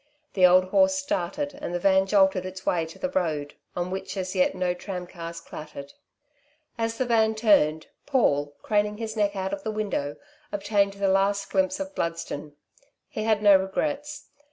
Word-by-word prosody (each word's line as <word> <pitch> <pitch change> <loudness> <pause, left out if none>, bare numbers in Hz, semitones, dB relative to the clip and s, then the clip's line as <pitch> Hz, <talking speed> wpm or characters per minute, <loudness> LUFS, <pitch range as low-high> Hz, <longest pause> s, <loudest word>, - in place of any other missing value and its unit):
The 185 -2 +6
old 185 +1 +6
horse 285 +4 +4
started 285 +2 -2
and 175 - -3
the - - 0
van 190 +1 +3
jolted 190 -2 +3
its 185 0 -8
way 165 -2 +1
to 160 - -12
the 275 - -3
road, 155 - -1 0.2
on 180 +1 -2
which 190 +1 -5
as 185 0 -3
yet 185 -2 +2
no 180 -1 0
tramcars 180 -2 -7
clattered. 145 -3 -9 0.8
As 225 -1 -2
the 255 - 0
van 220 -2 +2
turned, 160 -9 +3 0.2
Paul, 145 - +1
craning 210 -1 +1
his 220 0 -5
neck 205 -1 +1
out 190 0 -3
of 200 - -4
the 220 - -4
window, 205 -10 -2 0.4
obtained 200 -1 +1
the 200 0 -1
last 195 +1 +1
glimpse 190 -1 +1
of 290 0 -5
Bludston. 165 - -4 0.6
He 215 - -4
had 215 -1 +2
no 205 -1 +8
regrets. 290 +10 -2
195 Hz, 175 wpm, -26 LUFS, 180-215 Hz, 0.8 s, no